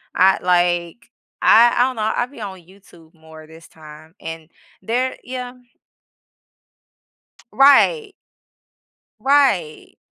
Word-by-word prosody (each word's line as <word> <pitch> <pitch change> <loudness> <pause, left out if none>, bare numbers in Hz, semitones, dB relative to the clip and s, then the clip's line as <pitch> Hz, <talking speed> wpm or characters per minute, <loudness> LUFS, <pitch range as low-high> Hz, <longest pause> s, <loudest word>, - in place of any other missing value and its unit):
I 190 +1 +3
like, 175 +3 -1 0.3
I 235 +1 +5
I 245 - +4
don't 260 - -6
know, 220 0 -2
I 240 - -1
be 250 -2 -15
on 190 -3 -8
YouTube 175 -3 -21
more 160 -1 -16
this 160 +1 -16
time 155 +1 -16
and 165 0 -9 0.3
there 250 +3 -3
yeah. 250 -1 -7 2.0
Right. 395 - +3 1.1
Right. 265 - 0
190 Hz, 105 wpm, -19 LUFS, 165-250 Hz, 2.0 s, I